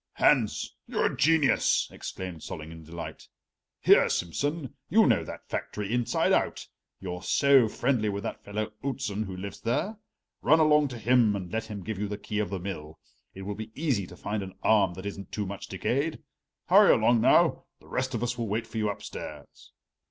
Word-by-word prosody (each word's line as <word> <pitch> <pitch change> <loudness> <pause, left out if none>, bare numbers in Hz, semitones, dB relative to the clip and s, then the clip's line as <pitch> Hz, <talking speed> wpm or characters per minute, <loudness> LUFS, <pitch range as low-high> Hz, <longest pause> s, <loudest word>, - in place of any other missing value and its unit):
"Hans, - - +2
you're - - 0
a - - -5
genius!" 155 -3 +3
exclaimed 90 -4 -7
Solling 80 +1 -7
in 80 0 -10
delight. 80 -1 -8 0.5
"Here, - - +6
Simsen, 140 - -2 0.2
you 220 +6 +5
know 115 -6 +3
that - - -9
factory 105 +1 -4
inside 120 -1 +1
and - - +6
out, - - -7 0.3
you're 90 -2 -5
so 135 +3 +5
friendly 120 -1 0
with 100 0 -3
that - - -5
fellow 105 +1 -4
Outzen 125 -6 -2
who 95 -2 -7
lives 100 +2 -7
there. 190 - -1 0.4
Run 160 +2 +5
along 150 -1 +5
to 125 -3 -7
him 115 -1 +3
and 95 -3 -5
let 110 0 -2
him 105 -3 -7
give 110 -1 -4
you 105 - -1
the 100 0 -4
key 105 +1 -4
of 105 - -1
the 100 - -3
mill. 80 -5 -6 0.4
It 95 - -7
will 105 +2 -3
be 110 +2 -7
easy 130 - 0
to 90 - -12
find 105 0 -3
an 95 -1 -8
arm 100 -5 +4
that 95 +2 -8
isn't 100 -1 -6
too 105 - -2
much 100 0 -6
decayed. 140 - -1 0.4
Hurry - - +7
along, 120 -2 +3
now; - - +4
the - - -20
rest 130 0 -2
of 115 - -2
us 120 0 -2
will 115 - -1
wait 110 +3 -1
for 115 - -5
you 105 -1 +1
upstairs." 100 - -8
105 Hz, 195 wpm, -28 LUFS, 95-125 Hz, 0.5 s, Hurry